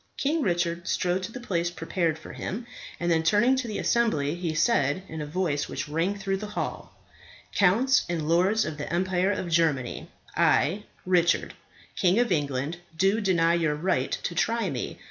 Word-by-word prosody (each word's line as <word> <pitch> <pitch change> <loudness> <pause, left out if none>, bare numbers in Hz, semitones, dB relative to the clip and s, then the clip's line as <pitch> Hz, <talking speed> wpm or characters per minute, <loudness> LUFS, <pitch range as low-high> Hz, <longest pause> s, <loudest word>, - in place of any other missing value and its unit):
King 310 +3 0
Richard 175 -4 -1
strode 180 +1 0
to 185 +4 -5
the 250 - -7
place 175 -8 -1
prepared 165 -1 -1
for - - -11
him, 225 +6 -5 0.3
and 175 0 0
then 165 -1 +3
turning 210 +10 +4
to 260 -2 -2
the 215 - -3
assembly 155 -12 +1
he 170 -2 -3
said, 155 - +2
in 160 -3 -6
a 150 - -4
voice 150 -3 -1
which - - -4
rang 165 +7 -1
through 195 -1 -1
the 210 +2 -6
hall, - - -4 0.6
"Counts 235 +9 +4
and 165 -3 -2
lords 185 +7 +3
of 155 -1 -5
the 150 - -5
Empire 185 +2 +1
of 190 -2 -3
Germany, 155 -7 0 0.3
I, 195 +8 +2 0.2
Richard, 175 -2 +2 0.4
King 185 0 +3
of 240 -3 +2
England, 145 0 -1 0.2
do 195 +5 +2
deny 170 -4 +3
your 160 -3 +1
right 150 -5 0
to - - -2
try 230 +6 0
me. - - -4
175 Hz, 180 wpm, -26 LUFS, 160-205 Hz, 0.6 s, turning